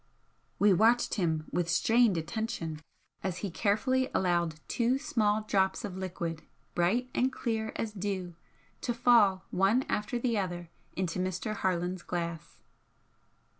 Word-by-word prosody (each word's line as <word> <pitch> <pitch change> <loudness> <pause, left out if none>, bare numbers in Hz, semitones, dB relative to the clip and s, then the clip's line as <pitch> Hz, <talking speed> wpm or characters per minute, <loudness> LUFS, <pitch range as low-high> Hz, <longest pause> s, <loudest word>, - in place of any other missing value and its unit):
We 205 -1 +5
watched 225 +6 +3
him 160 -6 0
with 175 -1 0
strained 225 +3 +4
attention 165 -3 -3 0.4
as 185 -3 -2
he 195 - -4
carefully 255 +8 +1
allowed 170 -4 +1
two 245 +2 +1
small 220 -8 +1
drops 195 -2 +1
of 195 -3 -6
liquid, 170 -4 -4 0.3
bright 220 +9 +1
and 260 +1 +2
clear 225 -4 -2
as 225 - -2
dew 190 -3 -3 0.5
to 240 - -1
fall 230 -6 +4
one 195 +8 +3
after 210 +3 -1
the 235 -3 0
other 175 -3 -4 0.2
into 185 -1 -2
Mr. 185 +4 -2
Harland's 180 -1 -1
glass. 170 -2 -5
195 Hz, 130 wpm, -30 LUFS, 175-230 Hz, 0.5 s, We